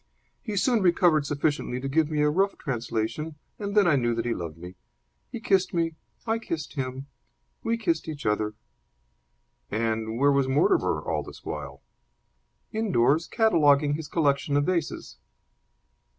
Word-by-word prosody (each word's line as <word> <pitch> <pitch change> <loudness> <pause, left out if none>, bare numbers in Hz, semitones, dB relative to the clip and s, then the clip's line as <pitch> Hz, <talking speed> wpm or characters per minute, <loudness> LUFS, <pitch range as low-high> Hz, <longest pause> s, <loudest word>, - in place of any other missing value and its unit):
He 210 -2 -4
soon 235 +2 +3
recovered 170 -5 +3
sufficiently 145 -3 -1
to 135 - -4
give 155 +2 +2
me 150 -1 0
a 150 - +4
rough 195 +5 +1
translation, 120 +4 -3 0.2
and 205 0 -3
then 205 - +6
I 150 -5 +4
knew 120 -2 +1
that 115 0 -2
he 120 - 0
loved 85 -5 -6
me. 90 +2 -9 0.6
He 235 - -5
kissed 190 -4 +1
me. 165 -1 +1 0.3
I 225 0 0
kissed 165 -8 -5
him. 130 -1 -4 0.6
We 230 0 0
kissed 170 -8 -1
each 150 -3 -6
other." 105 0 0 1.1
"And 110 0 -1
where 140 +3 +4
was 140 -1 +2
Mortimer 150 - +2
all - - -2
this - - -12
while?" - - -6 0.9
"Indoors, 165 - +2
cataloguing 150 - +3
his 155 0 -4
collection 145 -2 +1
of 145 - +2
vases." 170 -4 -2
150 Hz, 150 wpm, -26 LUFS, 130-180 Hz, 1.1 s, then